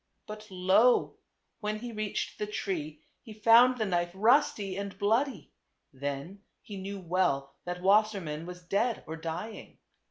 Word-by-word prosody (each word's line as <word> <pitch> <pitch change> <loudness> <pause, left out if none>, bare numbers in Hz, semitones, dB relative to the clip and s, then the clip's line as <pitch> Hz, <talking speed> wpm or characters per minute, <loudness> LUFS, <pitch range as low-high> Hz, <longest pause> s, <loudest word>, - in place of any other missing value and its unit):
But 215 0 -9
lo! 190 +6 +3 0.4
when 210 0 -2
he 240 +2 -7
reached 215 -2 -3
the 210 - -2
tree, 155 -7 -4 0.2
he 225 - -11
found 230 +4 +6
the 220 - 0
knife 175 -3 0
rusty 215 -3 +3
and 200 0 -5
bloody; 225 +7 0 0.4
then 140 +8 -5 0.2
he 205 - -8
knew 195 +1 -6
well 170 -7 0
that 180 0 -5
Wassermann 195 -6 +2
was 180 0 -9
dead 210 +7 0
or 160 - -6
dying. 165 +7 -6
195 Hz, 140 wpm, -29 LUFS, 175-215 Hz, 0.4 s, found